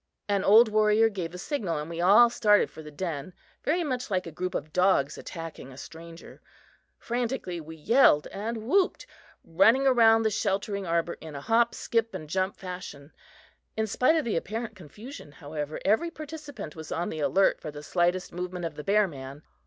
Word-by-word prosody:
An 200 -2 +1
old 220 +4 +7
warrior 215 +1 +3
gave 180 -5 -5
the 180 - -8
signal 185 - -2
and 150 +1 -4
we 170 0 -5
all 205 +7 +7
started 210 -3 +3
for - - -10
the 150 - -10
den, 155 +1 -5 0.3
very 340 +4 +1
much 255 -6 -3
like 185 -2 -1
a 165 - -7
group 180 +4 -4
of 155 - -4
dogs 180 -7 +2
attacking 165 -5 -8
a 130 - -13
stranger. 165 +4 -11 0.6
Frantically 235 -7 -3
we 160 +1 -10
yelled 160 - +4
and 220 +2 -5
whooped, 375 - +1 0.4
running 225 +11 +4
around 225 -4 +5
the 220 - +1
sheltering 200 -1 -1
arbor 170 0 -1
in 155 -2 -9
a 140 - -6
hop, 230 +7 +2
skip 230 -3 -1
and 155 -4 -7
jump 190 +4 -1
fashion. 180 -6 -8 0.7
In 220 - +1
spite 255 +8 +2
of 315 - 0
the 225 - -1
apparent 220 +5 -4
confusion, 190 - -11
however, 150 +1 -6
every 220 - +2
participant 300 - -8
was 160 -1 -9
on 170 +2 -2
the 155 - -5
alert 190 +6 +2
for - - -6
the 145 0 -9
slightest 175 +3 0
movement 180 0 -4
of 165 - -4
the 150 - -6
bear 210 +3 +3
man. 140 -1 -9
190 Hz, 185 wpm, -27 LUFS, 160-225 Hz, 0.7 s, old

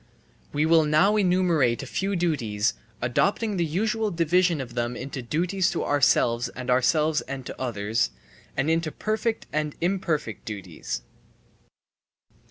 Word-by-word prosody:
We 150 +1 +1
will 160 0 +5
now 155 +8 +4
enumerate 175 - +2
a - - -5
few 195 +8 -2
duties, 120 - 0 0.3
adopting 200 - +1
the 175 - +2
usual 215 +6 0
division 175 -1 +2
of 125 -3 -6
them 120 0 -2
into 135 -1 -5
duties 175 +9 0
to 170 - -1
ourselves 120 -4 +3
and 125 0 -4
ourselves 150 +5 +3
and 135 -1 -5
to - - -8
others, 110 - 0 0.5
and 135 - +1
into 165 -1 +1
perfect 220 +4 -2
and 150 -1 -1
imperfect 170 - -1
duties. 90 - -6
155 Hz, 135 wpm, -25 LUFS, 125-180 Hz, 0.5 s, will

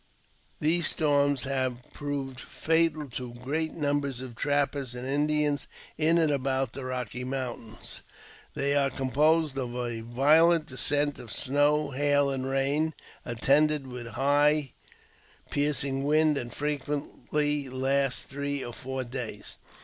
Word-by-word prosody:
These 165 +1 +2
storms 145 -3 +2
have 130 -2 -1
proved 140 -3 -4
fatal 160 -1 0
to 120 0 -6
great 150 +6 -2
numbers 145 -4 -1
o: 130 - -6
trappers 140 0 -1
and 125 +1 -6
Indians 150 +1 +1 0.3
in 160 +2 +3
and 160 -3 +3
about 135 -2 0
the 135 - -6
Rocky 125 -1 -4
Mountains 125 -3 -6 0.5
They 140 0 +1
are 140 -1 +3
composed 145 +3 +2
of 120 -2 -4
a 120 -2 -3
violent 155 +8 +4
descent 145 +2 0
of 120 -4 -9
snow, 145 +2 +2
hail, 145 +1 +2
and 130 -1 -3
rain, 140 +4 +1 0.3
attended 140 +5 +2
with 125 -2 -7
high 145 +3 +2 0.7
and - - -25
piercing 140 -2 0
wind, 155 +1 +3
and 120 -4 -4
frequently 145 0 -2
last 135 0 +1
three 140 0 -3
or 120 - -7
four 130 +1 -4
days. 120 -4 -6
140 Hz, 130 wpm, -28 LUFS, 130-150 Hz, 0.7 s, violent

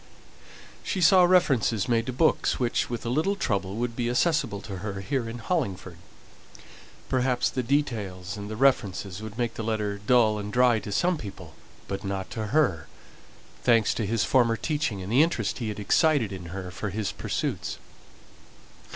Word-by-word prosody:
She 190 - -3
saw 180 +1 +6
references 135 - +3
made 115 -1 +1
to - - -1
books, 145 +6 +1
which, 120 -2 0
with 120 -1 -4
a - - -1
little 160 +10 +1
trouble, 100 - -2
would 120 0 -2
be 120 -1 -1
accessible 130 - +1
to 100 -3 -7
her 100 0 -5
here 125 +1 -2
in 115 - -6
Hollingford. 100 - -3 1.1
Perhaps 125 -1 +1
the 130 - -1
details 110 -9 -2
and 105 0 -7
the 110 - -4
references 105 -6 +1
would 110 0 -8
make 120 -1 -1
the 115 - -5
letter 105 -2 -2
dull 110 0 +3
and 105 0 -5
dry 125 -1 +4
to 105 - -7
some 175 - +1
people, 90 -6 -9 0.3
but 95 0 -4
not 95 -1 -4
to 110 -2 -3
her, 115 - +1 0.8
thanks 115 -3 +4
to 110 - -2
his 115 0 +1
former 120 -3 +3
teaching 145 - -2
and 95 - -6
the 130 +5 +5
interest 130 - 0
he 115 -3 -2
had 105 - -5
excited 135 - +2
in 95 -2 -7
her 90 +1 -6
for 105 +3 -4
his 105 +1 -2
pursuits. - - -3
115 Hz, 175 wpm, -26 LUFS, 100-130 Hz, 1.1 s, saw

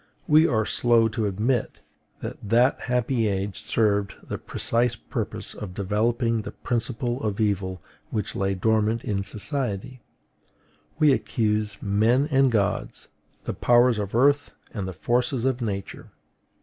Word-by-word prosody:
We 155 +1 +6
are 110 -6 +1
slow 115 -1 +3
to 105 0 -1
admit 110 +5 -1 0.4
that - - -5
that 120 +5 +2
happy 125 -2 +1
age 100 0 -2
served 100 -3 +1
the - - -4
precise 120 +1 0
purpose - - -5
of 95 -4 -8
developing 115 +3 0
the - - -8
principle 120 +1 -2
of 105 -1 -2
evil 95 -3 -1 0.3
which 105 - -3
lay 95 0 0
dormant 110 +3 +1
in 100 -2 -1
society; 110 +3 -3 1.0
we 150 -3 +5
accuse 105 -5 -1
men 110 +7 +2
and 135 -1 +4
gods, 100 -4 -1 0.3
the - - -3
powers 120 -1 +4
of 100 +1 -4
earth 140 +4 +3 0.2
and 100 -6 -3
the 95 - -5
forces 120 - 0
of 130 -1 0
Nature. 100 -4 -5
110 Hz, 135 wpm, -25 LUFS, 100-125 Hz, 1.0 s, We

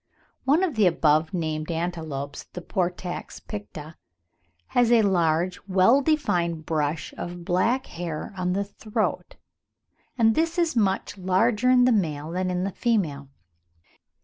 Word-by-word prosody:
One 295 +7 +3
of 360 -5 0
the 205 -4 +5
above 160 -2 +2
named 155 -3 -3
antelopes, 160 -5 -4
the 180 - -6
Portax 180 -1 -3
picta, 165 -7 -8 0.7
has 245 -1 +3
a 230 -2 +6
large 175 -2 +1
well 195 +8 +4
defined 175 - 0
brush 155 0 -2
of 175 0 -6
black 225 +9 +1
hair 170 +1 -6
on 180 -1 -1
the 200 +2 0
throat, 210 +1 -3 0.8
and 225 -2 +4
this 330 +4 0
is 335 -4 +1
much 195 -2 0
larger 210 +6 +2
in 250 -1 +6
the 255 - +4
male 160 -7 -1
than 185 +1 -1
in 180 0 -1
the 195 - -2
female. 165 - -1
185 Hz, 140 wpm, -25 LUFS, 165-225 Hz, 0.8 s, a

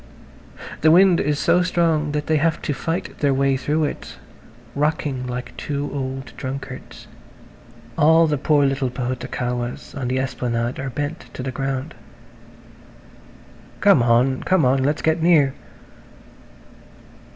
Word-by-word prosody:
The 155 - +5
wind 180 +1 +6
is 145 0 0
so 180 - +3
strong 165 -4 +1
that 150 0 -2
they 155 +1 +2
have 160 +2 +1
to 145 - -1
fight 165 +5 -4
their 140 -2 +2
way 135 0 +2
through 150 +4 0
it, 145 - -5 0.6
rocking 145 -3 -1
like 125 0 -6
two 145 0 -3
old 135 -1 -5
drunkards. 130 -1 -7 0.9
All 160 +2 +6
the 150 -3 0
poor 145 0 +3
little 135 -1 0
pahutukawas 125 -1 -4
on 135 -3 -3
the 130 +1 -1
esplanade 120 -2 -2
are 135 0 -3
bent 145 +5 -5
to 125 - -5
the 130 - -3
ground. 135 +3 -3 1.9
"Come - - +5
on! 120 +3 +2
Come 185 -5 +2
on! 130 +1 +3
Let's 145 +3 0
get 160 +1 +1
near." 155 -5 +4
140 Hz, 135 wpm, -21 LUFS, 130-155 Hz, 1.9 s, wind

